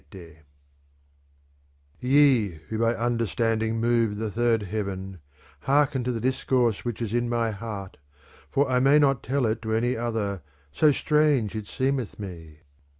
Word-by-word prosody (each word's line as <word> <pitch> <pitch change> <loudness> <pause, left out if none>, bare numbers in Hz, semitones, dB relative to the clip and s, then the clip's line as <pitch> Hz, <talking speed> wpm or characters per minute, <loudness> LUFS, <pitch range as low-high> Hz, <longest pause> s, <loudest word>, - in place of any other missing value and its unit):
I 85 -4 -12 1.6
Ye 130 -5 +4 0.2
who 110 - -3
by 115 +1 +2
understanding 115 -1 0
move 115 -2 +1
the 110 0 -3
third 115 0 +1
heaven 95 -2 -5 0.5
hear 145 +2 +5
ken 130 -2 -4
to 125 - 0
the 115 - -3
discourse 125 -2 0
which 120 -1 -3
is 110 -1 -4
in 120 0 0
my 115 -1 0
heart 105 -3 -7 0.5
for 140 +1 +1
I 125 -1 +2
may 135 +3 +5
not 140 -4 +3
tell 135 +1 0
it 110 +1 -1
to 110 -1 -3
any 120 +3 +1
other, 110 -5 -2 0.3
so 150 - +4
strange 145 -7 +1
it 110 -2 -5
seeraeth 130 -2 -2
me. 80 -6 -9
115 Hz, 150 wpm, -25 LUFS, 105-125 Hz, 1.6 s, hear